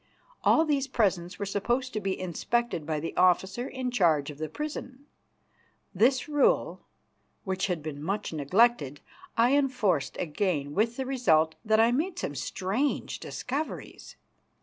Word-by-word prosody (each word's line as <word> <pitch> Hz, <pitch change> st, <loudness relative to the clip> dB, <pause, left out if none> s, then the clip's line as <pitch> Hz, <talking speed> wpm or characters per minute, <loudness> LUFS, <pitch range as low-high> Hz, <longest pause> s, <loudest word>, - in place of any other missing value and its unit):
All 320 Hz, -, +5 dB
these 280 Hz, -3 st, +1 dB
presents 185 Hz, -8 st, 0 dB
were 200 Hz, -, -3 dB
supposed 240 Hz, +6 st, -1 dB
to 215 Hz, -, -1 dB
be 195 Hz, -2 st, -2 dB
inspected 185 Hz, -1 st, -1 dB
by 155 Hz, -1 st, -1 dB
the 165 Hz, -, -5 dB
officer 190 Hz, +6 st, +2 dB
in 255 Hz, -2 st, -3 dB
charge 160 Hz, -10 st, +2 dB
of 145 Hz, -, -13 dB
the 155 Hz, -1 st, -3 dB
prison. 285 Hz, -, -6 dB, 0.9 s
This 255 Hz, -, +3 dB
rule, 300 Hz, -, +1 dB, 0.6 s
which 190 Hz, 0 st, -1 dB
had 175 Hz, -5 st, -2 dB
been 150 Hz, -2 st, -6 dB
much 195 Hz, +3 st, -3 dB
neglected, 155 Hz, -, +2 dB, 0.4 s
I 240 Hz, +4 st, +4 dB
enforced 245 Hz, -, +1 dB
again, 155 Hz, -4 st, -1 dB
with 225 Hz, +5 st, +1 dB
the 265 Hz, -, -2 dB
result 165 Hz, -12 st, +2 dB
that 220 Hz, -1 st, +3 dB
I 230 Hz, +1 st, +5 dB
made 335 Hz, +8 st, -1 dB
some 145 Hz, -, -3 dB
strange 195 Hz, -, -2 dB
discoveries. 285 Hz, +5 st, -5 dB
205 Hz, 145 wpm, -28 LUFS, 165-255 Hz, 0.9 s, All